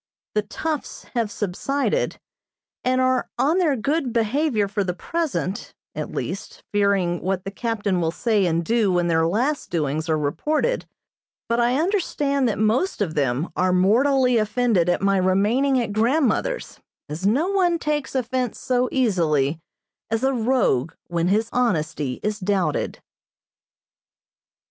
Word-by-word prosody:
The 210 - +2
"toughs" 300 +8 -4
have 230 -4 0
subsided, 225 +8 -1 0.6
and 255 0 +2
are 255 0 +1
on 320 +6 +2
their 315 -6 +2
good 275 +2 -1
behavior 230 0 +1
for 200 +1 -1
the 180 -2 -3
present, 290 - -3 0.2
at - - -4
least, - - -5
fearing 200 -4 +1
what 185 0 -1
the 195 - -5
captain 205 -4 -1
will 165 - +1
say 205 +2 +1
and 165 0 0
do 225 -2 +2
when 175 -1 +2
their 165 -1 +2
last 250 - -1
doings 155 0 -1
are 155 - +2
reported, 300 - -1 0.6
but 235 +1 +1
I 240 +3 +2
understand 295 - +1
that 210 - -2
most 225 - +1
of 185 -7 -1
them 140 +2 0
are 185 0 +2
mortally 250 +7 +3
offended 215 -4 +2
at 175 - 0
my 195 0 +3
remaining 210 +9 +2
at 230 -4 -2
grandmother's, 255 - 0 0.3
as 165 +6 -2
no 285 - +2
one 365 -4 +2
takes 300 -3 -2
offense 255 -1 -1
so 250 -1 0
easily 165 - +1 0.5
as 225 +2 -1
a 270 0 +2
rogue 220 - +1 0.2
when 170 0 0
his 215 +4 +2
honesty 155 - 0
is 210 0 -1
doubted. 185 -5 -1
220 Hz, 145 wpm, -23 LUFS, 180-260 Hz, 0.6 s, mortally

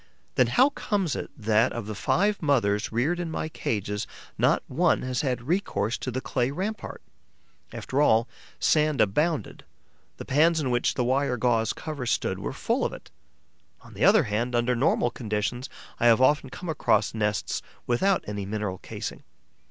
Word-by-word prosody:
Then 125 - +3
how 255 - +4
comes 195 - -1
it - - -5
that, 110 +1 +2
of 120 -3 -4
the 110 - -5
five 205 - +1
mothers 115 -9 +1
reared 140 +10 0
in 175 -2 -3
my 155 0 -3
cages, 105 - -3 0.3
not - - +2
one - - +1
has 130 -1 -1
had 125 -4 -2
recourse 125 - 0
to - - -4
the 130 +1 -2
clay 125 -1 -1
rampart? 195 +9 -5 0.7
After 135 +2 -2
all, 115 -4 +4 0.3
sand 155 -2 +2
abounded: 150 - 0 0.5
the - - -8
pans 160 +4 +3
in 135 -4 -1
which 120 0 +1
the 125 - +1
wire 130 0 +1
gauze 115 -1 +2
covers 145 -6 -5
stood - - 0
were - - -4
full - - -1
of - - -1
it. - - -12 0.7
On - - -15
the - - -3
other - - +6
hand, 115 +4 -1
under 120 +1 +2
normal 120 -1 +2
conditions, 110 +3 -3 0.3
I 120 - +4
have 115 0 +6
often 135 +1 +3
come 180 - -8
across 110 -9 +1
nests 105 -4 -1 0.2
without 190 +11 +2
any 100 -2 -4
mineral 105 -3 -3
casing. - - -6
125 Hz, 170 wpm, -26 LUFS, 110-150 Hz, 0.7 s, other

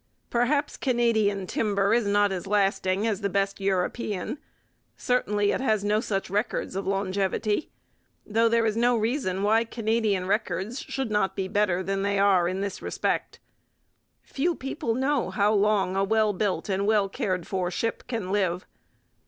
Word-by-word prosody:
Perhaps 280 +5 +1
Canadian 220 -6 +1
timber 200 0 +1
is 235 -3 +2
not 205 0 +3
as 185 -1 -4
lasting 195 0 +1
as 215 -3 -1
the 200 - 0
best 195 +1 -1
European. 195 +5 -2 0.6
Certainly 210 -5 +1
it - - -1
has 220 -6 +1
no 210 +1 +2
such 195 -3 -2
records 205 0 -2
of 195 0 -3
longevity; 195 - -1 0.6
though 225 +2 +2
there 230 0 +2
is 215 -1 +1
no 240 +1 +3
reason 220 -4 -1
why 220 +2 +3
Canadian 220 -4 0
records 210 +3 -1
should 265 -5 -4
not 210 -2 +1
be 190 -1 -2
better 190 -2 +1
than 195 +1 -1
they 200 0 0
are 195 -3 +4
in 185 +2 -2
this 200 -1 -4
respect. - - -2 0.8
Few 335 +5 -1
people 245 -3 -3
know 270 +1 0
how 205 +1 +2
long 200 -3 +2
a 195 - +2
well 215 +1 +2
built 185 -4 -1
and 200 0 0
well 210 -2 +3
cared 185 -3 -2
for 185 -2 -2
ship 230 +5 -3
can 225 -7 -3
live. 185 -3 0
205 Hz, 160 wpm, -26 LUFS, 195-225 Hz, 0.8 s, are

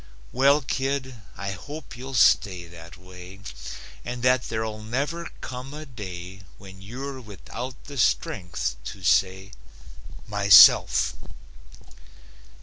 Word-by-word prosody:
Well, 140 +3 +4
kid, 135 0 -2 0.2
I 100 0 -4
hope 140 - -9
you'll 130 +2 -7
stay 95 -6 +3
that 85 -1 -13
way 90 +1 -13 0.6
And 120 0 -6
that 125 0 +3
there'll 110 -1 -3
never 140 +10 -3
come 130 +2 -7
a 155 +1 -8
day 95 -7 -9 0.2
When 95 -2 -13
you're 130 +6 -7
without 120 +4 -8
the 140 -3 -8
strength 90 - 0
to 95 +8 -8
say, 95 +2 +2 0.8
"MYSELF!" 100 -1 +7
110 Hz, 110 wpm, -25 LUFS, 95-130 Hz, 0.8 s, MYSELF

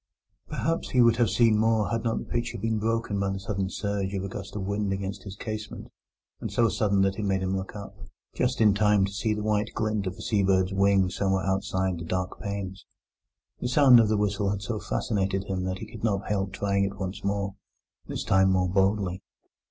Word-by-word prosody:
Perhaps 165 +1 -1
he 125 - +4
would 115 -1 +4
have 120 -3 +3
seen 115 -3 +4
more 110 -1 +2
had 115 -1 -1
not 115 -1 0
the - - -4
picture 120 0 -2
been 110 +1 -1
broken 115 -2 -1
by 100 -1 0
the 95 0 -3
sudden 95 -1 -2
surge 100 -1 -2
of 95 - -2
a - - -3
gust 100 +1 -8
of 105 - -3
wind 100 +1 -1
against 95 0 -3
his 95 -1 -7
casement, 110 0 -6 0.6
so 115 -1 +2
sudden 100 -4 +1
that 95 +1 +1
it - - -2
made 95 -1 0
him 95 +1 0
look 95 +1 -5
up, 100 -1 -8 0.4
just - - 0
in 105 -2 +6
time 105 -1 +3
to 100 - -5
see 105 +1 -1
the 105 - -4
white 105 0 +1
glint 110 -2 -1
of 90 - -4
a - - -9
seabird's 95 -3 +2
wing 95 -1 +3
somewhere 95 -1 0
outside 95 -2 0
the - - -5
dark 90 +2 -3
panes. 100 -2 -5 0.8
The - - -2
sound 130 -1 +7
of 110 -2 +4
the 110 - +2
whistle 100 -1 0
had 100 0 -2
so 110 0 -3
fascinated 95 -3 -1
him 95 -2 -3
that 95 0 -2
he 110 - -7
could 110 -2 -10
not 100 -3 0
help 95 -1 0
trying 100 0 0
it 100 0 -2
once 95 0 -5
more, 100 0 -1 0.5
this - - -4
time 95 0 +4
more 95 -1 +2
boldly. 95 0 +1
100 Hz, 215 wpm, -27 LUFS, 95-105 Hz, 0.8 s, sound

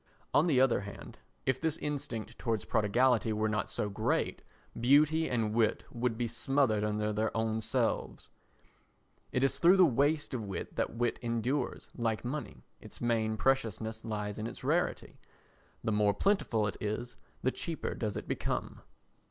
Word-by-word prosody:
On 155 +4 +5
the 140 -6 +4
other 130 -5 +4
hand, 100 0 -9 0.3
if 130 -1 +1
this 160 -1 0
instinct 120 -6 -4
towards 115 -3 -1
prodigality 115 +2 +2
were 110 +1 +1
not 105 -1 -1
so 105 - -1
great, 100 - -1 0.4
beauty 150 +6 +4
and 115 -4 0
wit 110 -1 +2
would 120 -1 -1
be 120 0 0
smothered 130 -4 +1
under 105 0 0
their 110 +1 +1
own 110 0 0
selves. - - -1 1.0
It 125 - +1
is 135 - +2
through 180 +3 +6
the 185 - +8
waste 145 +2 +1
of 125 - -2
wit 100 -2 -5
that - - -1
wit 120 0 0
endures, 120 +3 -1
like 115 -1 -1
money, 145 +4 -5 0.2
its - - -11
main 110 -2 +1
preciousness 110 -3 0
lies 105 -2 -3
in 110 - -2
its - - -9
rarity—the 110 - -3
more 105 -1 +3
plentiful 155 - +2
it 105 - -3
is 110 +3 -3 0.3
the 130 - +3
cheaper 165 +3 -3
does 105 -4 -3
it - - -6
become. - - -3
115 Hz, 160 wpm, -32 LUFS, 110-135 Hz, 1.0 s, the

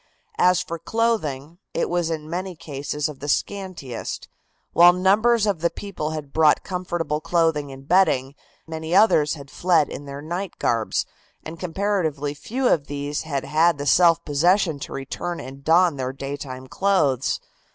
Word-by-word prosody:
As 180 0 +4
for 170 0 -6
clothing, 170 - -1 0.2
it - - +1
was 175 -1 0
in 155 -2 -4
many 180 +2 -4
cases 150 -2 -4
of 150 -3 -9
the 145 - -6
scantiest, 180 - -3 0.5
while 175 +1 +8
numbers 210 +5 +3
of 195 -6 0
the 170 - +2
people 185 -7 -5
had 150 -3 -6
brought 155 -2 +4
comfortable 175 -5 -3
clothing 160 -4 +1
and 135 0 -12
bedding. 150 -7 +3 0.3
Many 160 +1 -3
others 175 -8 +4
had 140 -2 -12
fled 170 -5 +2
in 145 - -7
their 140 +1 -7
night 175 +4 -4
garbs, 115 -2 0 0.4
and 160 +1 -8
comparatively 165 -6 -1
few 245 - -2
of 145 -10 +2
these 145 0 -3
had 140 -4 -3
had 165 +1 +3
the 145 - -4
self 170 +1 +4
possession 165 +2 +2
to - - -7
return 170 +6 -4
and 135 +1 -9
don 165 0 +4
their 130 0 -3
daytime 135 -1 -6
clothes. 145 -6 +1
160 Hz, 160 wpm, -23 LUFS, 145-180 Hz, 0.5 s, while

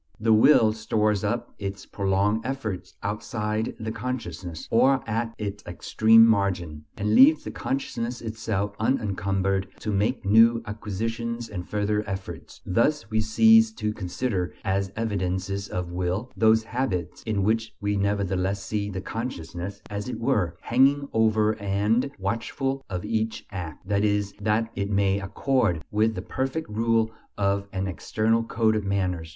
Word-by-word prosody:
The 110 +1 +3
will 110 -1 +6
stores 105 -2 0
up 120 +3 -2
its 100 -1 -5
prolonged 100 +2 0
efforts 115 -8 -4
outside 105 +1 -2
the 110 0 -3
consciousness, 95 -9 -5
or 130 +4 +4
at 115 +1 -2
its 105 -1 -5
extreme 110 +5 +5
margin, 90 -8 0
and 105 0 0
leaves 150 +6 +7
the - - -5
consciousness 120 -3 -3
itself 110 -3 -3
unencumbered 95 -4 0
to 105 - -2
make 105 +5 0
new 115 +3 +5
acquisitions 115 +3 -4
and 90 -4 -6
further 105 0 0
efforts. 95 -5 -7
Thus 115 +5 +1
we 110 0 +2
cease 225 - +5
to 105 - -2
consider 95 -1 -2
as 95 0 0
evidences 100 -2 -2
of 90 -1 -4
will 90 +7 -2
those 110 0 +4
habits 90 -8 -3
in 105 -3 -1
which 110 +1 0
we 105 0 -1
nevertheless 100 -1 0
see 105 0 -2
the 95 -1 -4
consciousness, 100 -3 -5
as 105 +3 -5
it - - -5
were, 105 -9 0
hanging 140 +3 +3
over 110 -1 +3
and 105 +6 +1
watchful 115 +7 -2
of 90 0 -4
each 110 0 -2
act, 90 -2 -7
that 100 0 +1
it 105 +1 0
may 100 -1 +2
accord 95 - 0
with 110 +1 +2
the 90 - -5
perfect 135 +8 -3
rule 115 0 +1 0.3
of 100 0 0
an 95 -1 -2
external 110 +5 0
code 110 -1 +1
of 105 - -1
manners. 90 -4 -1
105 Hz, 145 wpm, -25 LUFS, 95-115 Hz, 0.3 s, leaves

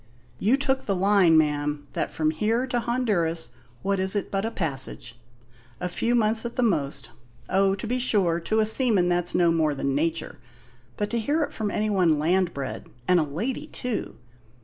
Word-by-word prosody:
"You 230 +7 +3
took 270 -1 0
the 200 - +1
line, 190 -3 +4
ma'am, 150 -1 0
that, - - -2
from 155 -1 0
here 220 +10 0
to 245 -2 -1
Honduras, 205 -10 -1 0.3
what 200 -1 0
is 190 +2 +1
it 205 - -2
but 195 +1 -1
a - - 0
passage? 135 - -4 0.6
A 180 - -2
few 230 +7 0
months 220 -1 +2
at 235 0 -5
the 250 - +1
most 145 - -1 0.4
oh, 195 0 +3
to 195 - -7
be 250 +3 -1
sure, 195 -9 +2
to 215 +6 -1
a 220 - +4
seaman 220 -5 +3
that's 175 0 +1
no 170 -1 +4
more 155 -3 +1
than 140 0 -1
nature; 160 +2 -2 0.6
but 205 - -2
to 235 - 0
hear 295 +8 +1
it 290 - -5
from 215 -2 -2
any 215 +1 -1
one 175 -6 +3
land 175 +4 +1
bred, 140 -3 -6 0.2
and 180 -1 +5
a - - +2
lady 225 - -4
too! 250 -6 -4
195 Hz, 195 wpm, -25 LUFS, 160-225 Hz, 0.6 s, and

